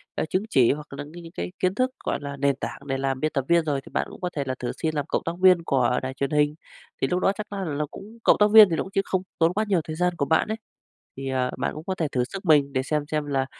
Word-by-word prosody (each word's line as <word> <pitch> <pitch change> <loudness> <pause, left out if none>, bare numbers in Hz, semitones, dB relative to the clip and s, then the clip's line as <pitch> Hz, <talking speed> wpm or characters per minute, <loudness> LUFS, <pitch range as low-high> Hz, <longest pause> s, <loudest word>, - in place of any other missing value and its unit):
ờ, - - -1
chứng 185 - 0
chỉ, 130 - +4
hoặc 150 +1 -4
là 140 +1 -5
những 165 +4 -11
cái 165 - -10
cái - - -4
kiến 185 +1 +1
thức, 255 +3 +1
gọi - - -1
là, 140 0 -6
nền 140 0 +2
tảng - - -5
để 135 -1 -1
làm 135 -1 -1
biên 155 +3 0
tập 135 -2 -1
viên 170 -1 +3
rồi, 145 -3 -1
thì - - -14
bạn - - -1
cũng - - -12
có 180 - -1
thể 140 - -1
là 130 -1 -2
thử 120 - -2
xin 155 -1 -1
làm 145 -2 -1
cộng - - -1
tác 165 - -1
viên 185 -2 +6
của 125 -5 +2
đài 130 0 -4
truyền 140 +1 -2
hình. 150 0 +2 0.5
Thì - - +2
lúc 180 - 0
đó 195 - +3
chắc 215 0 -6
á 200 -1 -4
là 155 - -3
nó 150 +1 -1
cũng 215 +4 -11
cộng - - +5
tác 210 0 +5
viên 215 -2 +10
thì 165 - 0
nó - - -1
cũng 190 - -11
chiếm 195 0 +1
không 185 - 0 0.2
tốn 165 +1 +3
quá 215 +2 0
nhiều 185 -5 +2
thời 155 - -6
gian 180 +1 +1
của 140 - 0
bạn 160 +2 +2
ấy, 220 +1 -2 0.6
thì, 135 0 -5
à, 130 -1 0
bạn - - -1
cũng 155 - -8
có 190 - -2
thể 165 -4 -1
thử 125 -1 +1
sức 190 +10 -8
mình 145 -4 +4
để 130 -1 0
xem 150 +2 -1
xem 150 -1 0
là 135 -2 0
155 Hz, 320 wpm, -25 LUFS, 140-180 Hz, 0.6 s, viên